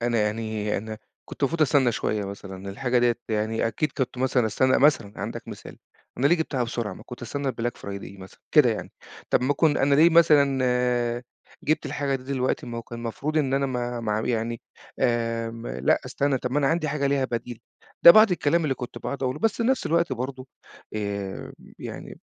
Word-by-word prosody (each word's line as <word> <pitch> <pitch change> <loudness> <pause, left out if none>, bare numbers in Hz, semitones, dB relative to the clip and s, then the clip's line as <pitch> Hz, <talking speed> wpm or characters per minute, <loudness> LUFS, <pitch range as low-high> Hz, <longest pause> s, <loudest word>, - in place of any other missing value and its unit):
أنا 120 -2 +1
يعني، 105 0 -1
أنا 110 +1 -7 0.3
كنت - - -11
المفروض 160 +3 +2
أستنى 130 -4 +3
شويّة 105 -1 -1
مثلًا، 100 -1 -8
الحاجة 125 +4 0
ديّة 120 -1 +3
يعني 110 +1 0
أكيد 135 +7 -1
كنت 130 -1 -2
مثلًا 125 -2 +2
أستنى 130 +5 +2
مثلًا 125 -8 +3
عندك - - -6
مثال، - - -10 0.4
أنا 135 - +3
ليه 175 - +4
جِبتها 145 -6 -1
بسرعة 115 -2 -3
ما - - -12
كنت 125 -1 -9
أستنى 140 +3 -3
الBlack 120 0 -3
Friday 100 -1 -8
مثلًا، 95 - -13
كده 145 -7 +7
يعني، 110 - -5 0.4
طَب - - +3
ما 140 +3 +2
كن 150 0 +3
أنا 140 +1 +3
ليه 165 +4 +6
مثلًا 125 -6 +3 0.4
جِبت 155 0 +1
الحاجة 140 0 -1
دي 130 - -13
دلوقتي، 130 -1 -1
ما 115 -1 -5
هو - - -6
كان 120 0 -9
المفروض 140 +7 -2
إن 135 -3 +1
أنا 140 0 +1
ما 120 -2 -3
ما 110 -2 -1
اع 110 +1 -1
يعني، 115 -1 -1 0.4
آمم 115 -1 -1
لأ 65 +2 +1
أستنى 140 -2 0
طَب 125 +1 -4
ما 145 - +2
أنا 140 - +2
عندي 160 -1 0
حاجة 140 -1 0
ليها 140 -1 +1
بديل، 120 -2 -4 0.4
ده - - +12
بعض 215 +2 +7
الكلام 170 -1 +1
اللي 140 -3 +1
كنت 125 -2 -7
باقعد 140 -1 -5
أقوله، 130 +3 -1
بس 225 +2 +2
في 230 - -1
نفْس 260 +2 +1
الوقت 170 -2 +1
برضه 130 +1 -5 0.5
آآ، 100 -2 -4 0.3
يعني - - -8
125 Hz, 200 wpm, -25 LUFS, 115-140 Hz, 0.5 s, ده